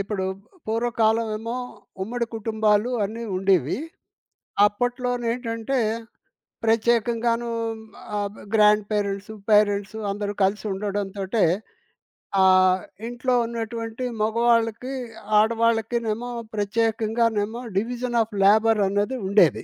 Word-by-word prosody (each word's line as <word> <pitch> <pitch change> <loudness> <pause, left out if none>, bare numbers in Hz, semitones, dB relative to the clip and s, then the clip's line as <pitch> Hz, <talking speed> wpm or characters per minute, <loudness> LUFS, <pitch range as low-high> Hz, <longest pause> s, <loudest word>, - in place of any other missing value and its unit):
ఇప్పుడు 195 -1 -2 0.4
పూర్వకాలం 225 0 +1
ఏమో, 230 +2 -4 0.5
ఉమ్మడి 235 +4 -2
కుటుంబాలు 220 0 +1
అన్నీ 225 +3 -5
ఉండేవి. 185 - +2 0.9
అప్పట్లోనేంటంటే 245 +1 -1 0.9
ప్రత్యేకంగాను 230 +1 +2 0.7
ఆహ్, 205 0 -3 0.2
గ్రాండ్ 210 -1 +5
పేరెంట్స్, 200 0 -2 0.2
పేరెంట్స్. 205 -1 +3
అందరూ 205 0 -3
కలిసి 200 +3 +1
ఉండడంతోటే 200 +1 -1 1.0
ఆహ్, 185 0 +5 0.3
ఇంట్లో 245 +1 -1
ఉన్నటువంటి 230 +1 -4 0.2
మగవాళ్ళకి, 230 +2 +1 0.5
ఆడవాళ్ళకినేేమో 230 +1 +1 0.3
ప్రత్యేకంగానేమో, 220 +1 0 0.2
డివిజన్ 240 +3 -1
ఆఫ్ 220 0 -3
లేబర్ 220 +2 +5
అనేది 205 +6 0
ఉండేది. 190 -7 +4
220 Hz, 85 wpm, -24 LUFS, 205-235 Hz, 1.0 s, గ్రాండ్